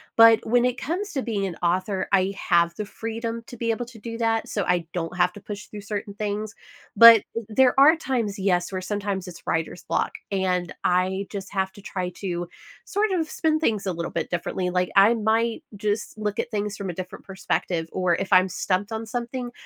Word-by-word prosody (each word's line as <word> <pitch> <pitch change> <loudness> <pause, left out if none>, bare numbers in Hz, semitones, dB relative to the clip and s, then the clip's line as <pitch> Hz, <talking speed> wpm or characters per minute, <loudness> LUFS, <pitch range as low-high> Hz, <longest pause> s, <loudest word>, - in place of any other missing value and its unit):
but 230 0 +7
when 245 +2 +3
it 250 0 0
comes 385 +7 -3
to 270 - -1
being 205 -4 -1
an 175 - -6
author, 185 +3 0
I 195 0 +3
have 170 -1 +2
the 210 - -4
freedom 230 +2 -5
to 245 - -10
be 230 0 0
able 240 +2 -2
to 240 -2 -13
do 230 +1 -6
that, 225 -1 0
so, 205 - -1
I 175 -2 +1
don't 170 0 -3
have 180 0 +3
to 205 - -11
push 205 0 -7
through 210 -1 -9
certain 205 0 -5
things, 210 +1 -3 0.4
but 230 0 +10
th 230 -2 -4
there 250 +4 +4
are 305 +4 +8
times, 235 -9 -2
yes, 180 -2 +1
where 185 -1 -3
sometimes 200 -1 -3
it's 175 -2 -11
writer's 165 +2 -2
block, - - -1 0.2
and 180 -4 0
I 185 +2 +1
just 195 -2 -6
have 190 -1 0
to 200 - -13
try 185 -2 -3
to 175 -3 -3 0.4
sort 415 +1 0
of 330 -4 0
spin 315 -1 +1
things 220 -10 0
a 185 - -1
little 170 0 -4
bit - - -3
differently, 180 +1 -2
like, 180 0 0
I 200 +4 +7
might 225 +1 0
just 210 +1 -2
look 210 -1 -3
at - - -1
things 210 -1 -2
from 195 -2 -4
a - - -3
different 185 +1 -8
perspective, 180 -3 -2
or 180 -2 +1
if 195 +3 -4
I'm 185 0 +6
stumped 195 +4 -1
on 220 +1 -3
something, 245 +2 -4
205 Hz, 215 wpm, -24 LUFS, 185-230 Hz, 0.4 s, but